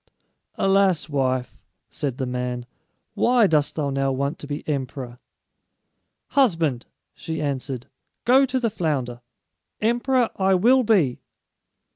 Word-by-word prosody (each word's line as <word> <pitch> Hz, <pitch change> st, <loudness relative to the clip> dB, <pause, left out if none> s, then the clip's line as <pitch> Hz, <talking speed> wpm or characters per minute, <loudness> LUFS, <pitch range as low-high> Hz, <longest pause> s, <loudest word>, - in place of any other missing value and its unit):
"Alas, 195 Hz, -5 st, +2 dB
wife," 130 Hz, -3 st, -1 dB, 0.3 s
said 135 Hz, -4 st, -3 dB
the 130 Hz, -, -2 dB
man, 125 Hz, -1 st, -3 dB, 0.5 s
"why 245 Hz, -2 st, +4 dB
dost 150 Hz, -5 st, +2 dB
thou 145 Hz, -3 st, -1 dB
now 135 Hz, 0 st, 0 dB
want 140 Hz, +4 st, -2 dB
to 145 Hz, -, -8 dB
be 145 Hz, 0 st, -6 dB
emperor?" 130 Hz, -4 st, -4 dB, 1.1 s
"Husband," 165 Hz, -, +1 dB, 0.3 s
she 160 Hz, -1 st, -5 dB
answered, 135 Hz, -4 st, -3 dB, 0.4 s
"go 260 Hz, +3 st, +6 dB
to 260 Hz, +1 st, 0 dB
the 230 Hz, -3 st, 0 dB
flounder. 135 Hz, -, -2 dB, 0.6 s
Emperor 240 Hz, +2 st, +1 dB
I 190 Hz, 0 st, +3 dB
will 245 Hz, +8 st, +5 dB
be." 190 Hz, -, +2 dB
150 Hz, 120 wpm, -23 LUFS, 130-210 Hz, 1.1 s, go